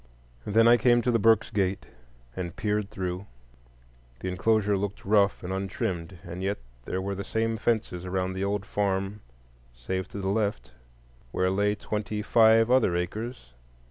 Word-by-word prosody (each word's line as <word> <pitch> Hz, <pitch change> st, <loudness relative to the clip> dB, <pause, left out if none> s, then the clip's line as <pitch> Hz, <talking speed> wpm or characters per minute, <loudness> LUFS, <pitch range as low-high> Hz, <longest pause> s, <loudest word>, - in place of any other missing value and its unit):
Then 115 Hz, +2 st, +5 dB
I 120 Hz, +1 st, +7 dB
came 120 Hz, -1 st, +4 dB
to 125 Hz, -, +2 dB
the 115 Hz, -, +2 dB
Burkes' 110 Hz, +1 st, +4 dB
gate 95 Hz, -3 st, 0 dB, 0.5 s
and 85 Hz, -2 st, -5 dB
peered 105 Hz, -1 st, -1 dB
through; 95 Hz, 0 st, -4 dB, 0.9 s
the 95 Hz, -, -2 dB
enclosure 105 Hz, +2 st, +2 dB
looked 100 Hz, 0 st, -4 dB
rough 100 Hz, -1 st, +3 dB
and 90 Hz, +1 st, -3 dB
untrimmed, 95 Hz, -2 st, -3 dB
and 90 Hz, -1 st, -7 dB
yet 100 Hz, +2 st, -1 dB, 0.3 s
there 95 Hz, -, -2 dB
were 100 Hz, +1 st, -2 dB
the 100 Hz, +1 st, -4 dB
same 115 Hz, +2 st, -1 dB
fences 110 Hz, -6 st, -1 dB
around 95 Hz, 0 st, -2 dB
the 95 Hz, +1 st, -3 dB
old 100 Hz, 0 st, -1 dB
farm 100 Hz, -1 st, -1 dB, 0.6 s
save 95 Hz, +11 st, -3 dB
to -, -, -9 dB
the 95 Hz, -1 st, -2 dB
left, 100 Hz, -, -1 dB, 0.6 s
where 95 Hz, 0 st, +1 dB
lay 105 Hz, +2 st, +1 dB
twenty 105 Hz, 0 st, -3 dB
five 115 Hz, +1 st, +5 dB
other 120 Hz, -9 st, +4 dB
acres. 95 Hz, -, -4 dB
100 Hz, 160 wpm, -27 LUFS, 95-110 Hz, 0.9 s, I